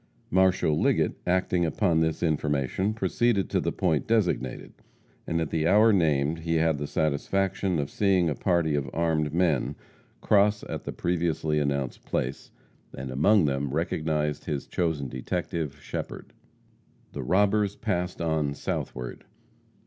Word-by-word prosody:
Marshal 95 -4 +3
Liggett, - - +1
acting 90 -1 +1
upon 85 0 +1
this 80 0 0
information, 75 +4 0
proceeded 115 -3 +1
to - - +2
the - - -1
point 80 -6 0
designated, 90 - 0 0.5
and 85 - 0
at 80 -2 -2
the 80 0 +1
hour 105 +4 +6
named 80 -3 +2
he 85 0 -1
had 80 -2 +2
the 75 - -3
satisfaction 90 +5 0
of 70 -2 -1
seeing 95 -4 +2
a 75 - +1
party 85 -2 +1
of 70 -3 -1
armed 80 -3 0
men 80 -4 +1 0.4
cross 105 0 +3
at - - -6
the - - -3
previously 80 -3 0
announced 70 -3 -2
place, 65 +2 -3 0.5
and 65 0 -5
among 85 +8 +4
them 70 0 -1
recognized 75 -2 -1
his 75 -4 -3
chosen 80 -6 -1
detective, 75 +3 -4
Shepherd. - - -6 0.8
The 70 - -5
robbers 100 +7 +2
passed 90 -5 -2
on 80 -4 0
southward. 60 -3 -4
80 Hz, 140 wpm, -27 LUFS, 75-90 Hz, 0.8 s, hour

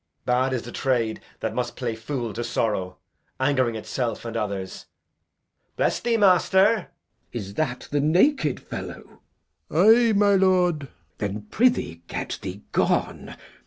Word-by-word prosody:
Bad 125 +2 +2
is 125 - -2
the 120 - -8
trade 120 -5 0 0.2
that - - -2
must 120 -1 -3
play 120 -3 -2
fool 115 0 -4
to 120 - -3
sorrow, 105 -6 -1 0.4
Ang'ring 130 -4 +1
itself 115 +1 -3
and 115 0 -5
others. 100 -4 -4 0.9
Bless - - +1
thee, 235 -1 +1
master! 195 +1 +4 0.4
Glou. 120 - -4
Is 100 -2 -7
that 125 -1 -2
the 145 - +1
naked 160 - +3
fellow? - - -9 0.5
Old 170 +5 +3
Man. 235 0 +4
Ay, - - +2
my 205 0 +4
lord. 185 -4 +3
Glou. 140 -2 -10 0.3
Then 105 0 -3
prithee 220 - +1
get - - -4
thee 95 +3 -7
gone. - - 0
130 Hz, 150 wpm, -24 LUFS, 115-185 Hz, 0.9 s, master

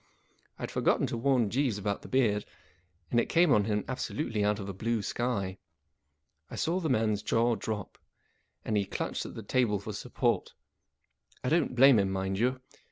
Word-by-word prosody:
I - - -8
had - - -4
forgotten - - +2
to - - -3
warn 125 -4 +2
Jeeves 130 -4 +1
about 100 0 -2
the - - -11
beard, 110 -6 +2 0.7
and 120 - +4
it - - 0
came 170 -2 +4
on 105 -4 +4
him 105 -1 0
abso¬ 130 - -4
lutely 115 -8 -1
out 105 0 +2
of 100 -2 -6
a 100 - -4
blue 110 +2 -1
sky. 100 -4 -2 0.9
I - - -7
saw 175 +3 0
the 165 -4 -2
man's 110 -4 +1
jaw 115 +2 +2
drop, 105 -1 -5 0.7
and 110 - -1
he 100 -1 +2
clutched - - -3
at - - -10
the 115 - -7
table 115 -1 +1
for 105 +2 -6
support. - - -1 0.9
I 125 - 0
don't 160 -5 +1
blame 130 -2 +7
him, 100 -1 +1
rrtind 95 0 -2
you. 125 +4 +1
110 Hz, 190 wpm, -30 LUFS, 100-130 Hz, 0.9 s, blame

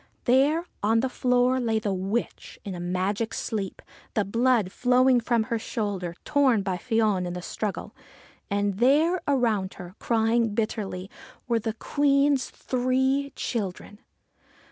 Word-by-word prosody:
There 280 +7 +3 0.2
on 225 +2 +3
the 260 - -1
floor 250 0 +2
lay 225 -3 0
the 210 -2 -1
witch, 195 +5 -3
in 195 - -4
a 175 - -6
magic 190 +5 -2
sleep, 200 -4 -4 0.3
the 210 - +1
blood 230 -1 +2
flowing 250 +1 +3
from 235 -1 +1
her 230 +1 -2
shoulder, 200 -7 -3
torn 270 -8 +3
by 190 -2 -2
Fion 215 -4 +1
in 175 - -4
the 180 - -5
struggle. 210 +1 -4 0.6
And 200 -1 -1
there, 305 +9 +3
around 225 -9 +1
her, 180 -1 -9
crying 225 -1 +1
bitterly, 205 -4 -2 0.4
were 235 -2 +2
the 220 0 -3
Queen's 280 +2 +2
three 265 +2 0
children. 205 -2 -4
225 Hz, 140 wpm, -26 LUFS, 200-255 Hz, 0.6 s, There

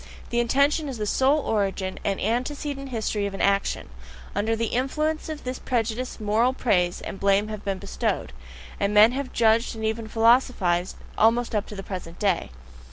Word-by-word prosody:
The 240 - +1
intention 280 +5 +2
as 260 - -5
the 210 - -2
sole 265 +7 +3
origin 195 -5 -1
and 195 -1 -1
antecedent 275 +5 -2
history 215 -4 -1
of 195 - -6
an - - -7
action: 200 0 +1 0.5
under 215 +3 0
the 230 0 -1
influence 305 +6 -1
of 310 -1 -6
this 255 0 -4
prejudice 240 0 -2
moral 220 +4 +2
praise 180 -9 +1
and 195 - -7
blame 200 +2 +2
have 215 -1 -6
been 195 -1 -2
bestowed, 190 - -3 0.5
and 200 +1 0
men 215 +3 +8
have 265 0 -4
judged 230 +1 +2
and 220 0 -4
even 220 0 -2
philosophized 225 -6 +2 0.2
almost 230 +2 +3
up 210 -1 -1
to 210 - -8
the 195 - -6
present 180 -3 -7
day. 200 - 0
220 Hz, 175 wpm, -25 LUFS, 200-255 Hz, 0.5 s, men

